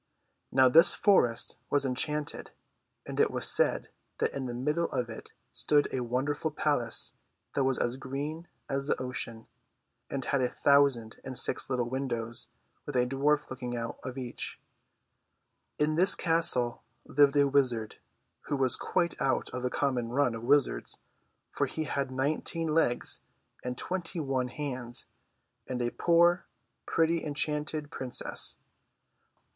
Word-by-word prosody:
Now 130 0 +6
this 165 +6 +8
forest 120 - +3
was 140 -1 +2
enchanted, 150 +3 0 0.6
and - - -6
it - - +4
was - - 0
said - - +2 0.3
that - - 0
in 135 -2 -3
the 120 - -4
middle 150 +7 0
of 120 -2 -2
it 110 - -10 0.2
stood 145 -1 +2
a 130 - 0
wonderful 130 +6 -1
palace 145 -6 -1 0.4
that 135 - +1
was 130 -1 +1
as 120 +2 -1
green 145 +5 -5 0.2
as 135 0 -2
the - - 0
ocean, 115 -3 -5 0.6
and 135 -2 -3
had 140 - +1
a 125 - +1
thousand 140 -6 +3
and 130 -2 -5
six - - +1
little 125 -2 0
windows 120 -3 -2 0.4
with - - -5
a 125 -1 +3
dwarf 140 +3 +1
looking 125 -2 -4
out 115 0 -5
of 130 0 -6
each. 125 -2 -5 1.2
THE - - +2
ENCHANTED - - +3
FOREST. - - +1
In 155 - -1
this 190 - +5
castle 160 -8 +2 0.2
lived 145 0 +4
a 140 0 +5
wizard, 125 -6 +1 0.5
who - - -1
was 130 -2 +4
quite 175 -2 0
out 135 0 0
of 125 - -4
the 125 - -1
common 125 -4 -1
run 125 0 +1
of 115 - -6
wizards, 140 +3 +1 0.5
for - - 0
he 160 - -3
had 140 -3 -2
nineteen 150 +5 -1
legs 150 -6 +1 0.4
and 125 0 -4
twenty 180 -2 -2
one 135 -4 -1
hands, 125 -3 -3 0.6
and 125 -1 -3
a 120 -1 -1
poor, 170 +1 +3 0.4
pretty 165 0 +1
enchanted 150 0 -1
princess. 130 -5 -1
135 Hz, 150 wpm, -29 LUFS, 125-150 Hz, 1.2 s, this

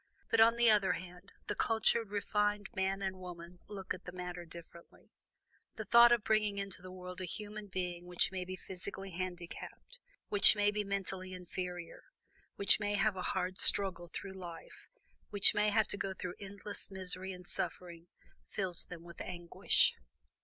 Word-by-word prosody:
But, 225 - +5
on 230 +1 +7
the 235 -1 +6
other 205 -3 +4
hand, 180 +1 -9
the - - -2
cultured, 225 +1 +2
refined 210 0 0
man 190 0 0
and 190 -1 -2
woman 175 -1 -9
look 195 -2 -4
at 185 - -10
the 180 - -6
matter 180 -1 -6
differently. 170 +1 -12 0.6
The 220 - -5
thought 235 +3 +8
of 235 -3 +4
bringing 210 -2 +2
into 195 -2 -4
the 185 0 -9
world 180 0 -7
a - - -2
human 210 +3 -6
being 180 -2 -4
which 180 +1 +2
may 185 -1 -3
be 185 +1 -5
physically 195 +1 -7
handicapped, 180 - -6 0.3
which 205 +1 +7
may 205 0 +3
be 210 0 -1
mentally 195 -2 -3
inferior, 180 -1 -6 0.5
which 200 - +4
may 205 -1 0
have 205 0 +2
a 185 - -4
hard 185 0 -1
struggle 185 -3 +1
through 195 -1 -6
life, 175 -3 -10 0.4
which 205 -1 +6
may 210 0 +3
have 215 +1 +3
to - - -2
go 195 -1 -3
through 180 -1 -5
endless 200 +1 -7
misery 190 0 -4
and 180 -1 -9
suffering, 170 -2 -4 0.4
fills 185 -4 +2
them 170 -2 -9
with 170 0 -10
anguish. 175 -2 +2
190 Hz, 170 wpm, -34 LUFS, 180-205 Hz, 0.6 s, thought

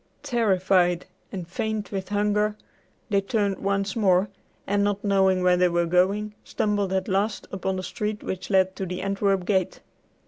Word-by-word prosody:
Terrified 185 -6 +2 0.3
and 180 -4 -5
faint 215 +3 -3
with 190 -2 -4
hunger, 210 +1 +1 0.6
they 200 -1 +3
turned 200 -1 -1
once 200 0 -1
more, 190 -3 +3 0.4
and, 200 +1 +1
not 205 0 -1
knowing 190 -2 +3
where 180 0 +4
they 180 0 +4
were 170 0 +1
going, 195 +5 +1
stumbled 205 -2 -1
at 190 -1 0
last 200 +2 -1
upon 190 0 -2
the 185 - -4
street 210 +2 -4
which 185 -1 -5
led 190 -1 +3
to 190 - -3
the 180 +1 -4
Antwerp 195 -1 0
gate. 190 -3 0
195 Hz, 165 wpm, -25 LUFS, 185-205 Hz, 0.6 s, where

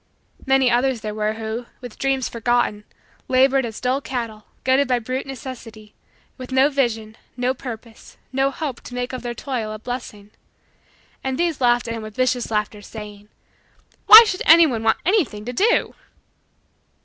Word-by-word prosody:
Many 265 -2 +3
others 245 0 +1
there 210 -1 -4
were 215 0 -1
who, 225 +2 -5
with 245 -3 -11
dreams 270 -2 0
forgotten, 230 -2 -1 0.4
labored 265 0 +3
as 225 - -8
dull 255 +2 0
cattle, 230 -5 -5 0.2
goaded 265 +1 +3
by 250 -1 +2
brute 255 +3 -4
necessity, 230 -5 -9 0.5
with 255 0 -8
no 265 +2 +4
vision, 225 -6 -1 0.2
no 250 +1 0
purpose, 230 -3 -10 0.2
no 270 +1 +2
hope, 275 -3 -5
to 245 - -8
make 250 +1 -3
of 255 - -5
their 240 -1 -5
toil 240 -5 -4
a 215 - -6
blessing. 215 -3 -7 0.9
And 265 -1 -2
these 340 -5 -1
laughed 240 -1 +2
at 230 - -3
him 225 - -5
with 215 -1 -9
vicious 255 -1 0
laughter, 210 -1 -2
saying: 210 -1 -10 0.8
"Why 445 +2 +12
should 380 -3 -3
anyone 315 -8 +6
want 225 0 +2
anything 315 - 0
to 245 - -5
do?" 440 - +2
245 Hz, 160 wpm, -21 LUFS, 220-265 Hz, 0.9 s, Why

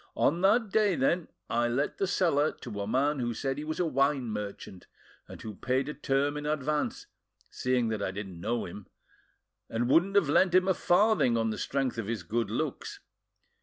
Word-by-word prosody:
"On 165 +5 +2
that 210 +2 +3
day, 210 -4 +3
then, 165 +5 +1 0.2
I 120 +1 +1
let 130 +5 -1
the 195 - +1
cellar 165 -5 +2
to 105 -5 -5
a 100 - -3
man 140 +5 +1
who 120 -2 -2
said 135 +2 -2
he - - -4
was 155 +1 -4
a 180 - +2
wine 140 -4 +1
merchant, 100 -3 -7 0.4
and - - -10
who 110 - -6
paid 130 +6 -1
a 150 - -3
term 145 0 0
in 150 0 -4
advance, 150 0 -1 0.5
seeing 125 -2 0
that 110 -2 -2
I 100 - -1
didn't 95 -3 -7
know 115 +4 -1
him, 95 +3 -9 0.8
and 120 +1 -1
wouldn't 175 +9 +3
have 200 -7 +4
lent 180 +5 +3
him 185 0 +4
a 190 - +4
farthing 175 - +3
on 115 -1 0
the - - -4
strength 135 -4 -1
of 105 - -4
his 115 -5 -3
good 115 +7 -1
looks. - - -3
135 Hz, 200 wpm, -29 LUFS, 115-155 Hz, 0.8 s, have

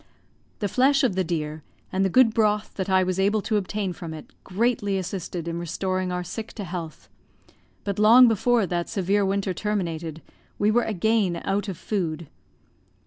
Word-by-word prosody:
The 205 - +1
flesh 275 +7 +3
of 250 - +2
the 190 0 0
deer, 155 -3 -3 0.3
and 190 +1 +1
the 190 - +2
good 230 +2 +5
broth 210 -2 +1
that 190 0 -3
I 190 0 +4
was 185 0 -1
able 205 +2 +2
to 215 - +1
obtain 200 -1 -2
from 170 -3 -7
it, 155 - -11
greatly 205 -1 0
assisted 180 -2 -4
in 170 0 -3
restoring 185 +2 -2
our 180 0 -2
sick 220 +6 -7
to 210 - -6
health; 170 -3 -7 0.8
but 200 0 -3
long 235 +4 +8
before 230 0 +2
that 175 -1 -2
severe 200 0 +1
winter 195 0 0
terminated 165 -5 -3 0.3
we 205 +1 +2
were 240 +2 +2
again 210 -3 +1
out 195 +1 0
of 190 -4 -5
food. 170 -6 -3
195 Hz, 175 wpm, -25 LUFS, 175-215 Hz, 0.8 s, long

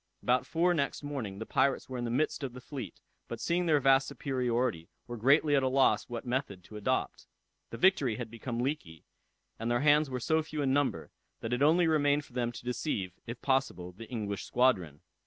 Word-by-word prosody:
About 125 +1 +2
four 175 +2 +2
next 140 -3 -1
morning, 130 -10 -4
the 110 - -5
pirates 135 +3 +1
were 130 -1 -5
in 120 - -2
the - - -2
midst 140 +7 0
of 130 -3 -4
the 125 - -8
fleet, 125 - -8 0.3
but 115 - -6
seeing 175 +7 0
their 150 -3 +4
vast 135 0 +4
superiority, 125 - -1 0.2
were 120 - -6
greatly 140 +6 +4
at 135 - +4
a 130 - +1
loss 135 0 +2
what 120 0 -5
method 120 -7 -3
to 105 - -13
adopt. 105 - -2 0.4
The 115 - -7
Victory 145 - +3
had 115 -1 -6
become 115 +1 -5
leaky, 125 - -4 0.5
and 115 +1 -2
their 120 +1 +1
hands 150 0 +4
were 130 -1 -3
so 160 +6 +1
few 155 -1 -4
in 135 -1 +2
number, 145 0 0 0.3
that 115 - -3
it 125 - -1
only 165 +4 +5
remained 145 -2 +2
for - - -20
them 120 -1 -1
to 120 - -10
deceive, 120 - -2
if 120 +1 -7
possible, 130 -10 0
the 110 +5 -11
English 105 -5 -3
squadron. 95 - +1
130 Hz, 210 wpm, -30 LUFS, 115-145 Hz, 0.5 s, only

